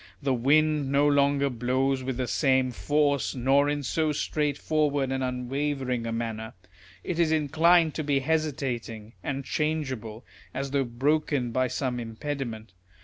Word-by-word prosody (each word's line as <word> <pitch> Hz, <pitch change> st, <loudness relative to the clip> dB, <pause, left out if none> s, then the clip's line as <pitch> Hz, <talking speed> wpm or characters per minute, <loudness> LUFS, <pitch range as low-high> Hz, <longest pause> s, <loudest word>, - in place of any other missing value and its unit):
The 140 Hz, -2 st, 0 dB
wind 145 Hz, +3 st, +2 dB
no 140 Hz, +1 st, +4 dB
longer 140 Hz, -1 st, +3 dB
blows 130 Hz, +2 st, 0 dB
with 130 Hz, -1 st, -3 dB
the 130 Hz, -, -1 dB
same 130 Hz, -2 st, +2 dB
force, 145 Hz, +2 st, 0 dB
nor 135 Hz, +3 st, +3 dB
in 145 Hz, 0 st, -1 dB
so 155 Hz, +4 st, 0 dB
straightforward 145 Hz, -1 st, 0 dB
and 135 Hz, 0 st, -1 dB
unwavering 125 Hz, -1 st, -2 dB
a -, -, -2 dB
manner; 115 Hz, -1 st, -4 dB, 0.5 s
it 175 Hz, -2 st, -3 dB
is 165 Hz, -2 st, +3 dB
inclined 160 Hz, +2 st, +3 dB
to 155 Hz, -, -3 dB
be 140 Hz, -2 st, +1 dB
hesitating 130 Hz, -8 st, -2 dB
and 135 Hz, 0 st, -4 dB
changeable, 135 Hz, -8 st, -3 dB, 0.3 s
as 135 Hz, +1 st, -3 dB
though 140 Hz, -1 st, +1 dB
broken 135 Hz, +1 st, 0 dB
by 130 Hz, +2 st, +1 dB
some 125 Hz, 0 st, -2 dB
impediment. 115 Hz, -3 st, -5 dB
135 Hz, 145 wpm, -27 LUFS, 125-150 Hz, 0.5 s, no